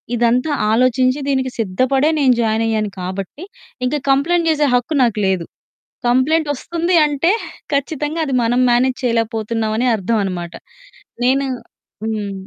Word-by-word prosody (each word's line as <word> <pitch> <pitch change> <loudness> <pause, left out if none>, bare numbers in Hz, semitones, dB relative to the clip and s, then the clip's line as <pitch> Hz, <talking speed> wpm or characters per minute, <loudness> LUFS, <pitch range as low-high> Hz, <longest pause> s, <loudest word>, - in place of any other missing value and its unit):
ఇదంతా 240 +5 +1 0.2
ఆలోచించి 255 +3 +2
దీనికి 265 -2 0
సిద్ధపడే 255 +8 +1
నేను 260 -3 +4
జాయినయ్యాను 220 -1 0
కాబట్టి, 190 - -6 0.4
ఇంకా 280 +4 0
కంప్లెయింట్ 330 +5 +2
చేసే 300 -2 +2
హక్కు 245 +5 +1
నాకు 225 -3 0
లేదు. 185 -3 0 0.6
కంప్లెయింటొస్తుంది 315 +6 +1
అంటే 295 +4 +1 0.4
ఖచ్చితంగా 295 +3 -2
అది 270 - -3
మనం 240 +2 +1
మ్యానేజ్ 250 +2 +2
చేయలేకపోతున్నామనే 225 0 -1
అర్థం 220 +2 -1
అన్నమాట. 175 -3 -4 0.7
నేను 270 +2 +2 0.6
హ్మ్. 210 -3 -3
250 Hz, 115 wpm, -18 LUFS, 220-280 Hz, 0.7 s, నేను